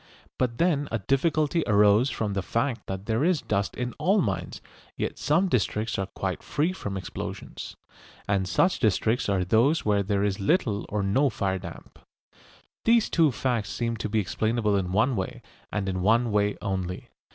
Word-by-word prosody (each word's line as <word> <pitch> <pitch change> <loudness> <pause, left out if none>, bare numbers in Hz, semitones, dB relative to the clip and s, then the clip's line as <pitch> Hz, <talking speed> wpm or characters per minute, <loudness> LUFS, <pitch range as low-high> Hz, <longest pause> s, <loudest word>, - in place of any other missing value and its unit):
But 120 -2 0
then 155 -5 +1
a 115 - +1
difficulty 150 - +1
arose 105 +4 +5
from 105 -6 -2
the 100 - -1
fact 115 - -2
that 95 0 -5
there 115 +4 0
is 170 -5 +2
dust 100 -3 -1
in 125 0 -3
all 200 +3 +3
mines, 95 - -2 0.4
yet - - -3
some 165 +7 +2
districts 110 - 0
are 95 - -2
quite 95 -1 -4
free 155 +5 0
from 100 - -5
explosions. 95 - -7 0.5
And 100 -2 +1
such 95 - +2
districts 110 0 +1
are 95 -2 +1
those 120 - +3
where 105 -1 +3
there 100 0 0
is 100 0 0
little 105 - +1
or 105 -1 -1
no 135 +9 +2
fire 95 -4 -1
damp. - - -11 0.8
These 230 -1 +3
two 160 -4 +4
facts 120 -5 -1
seem 115 +5 -2
to 110 - -3
be 110 - 0
explainable 110 +1 0
in 90 -2 -1
one 115 +7 +2
way, 95 -3 -4 0.3
and 100 -2 -2
in 95 -1 -2
one 115 +4 +3
way 105 0 +1
only. 95 -3 -3
110 Hz, 175 wpm, -26 LUFS, 100-130 Hz, 0.8 s, arose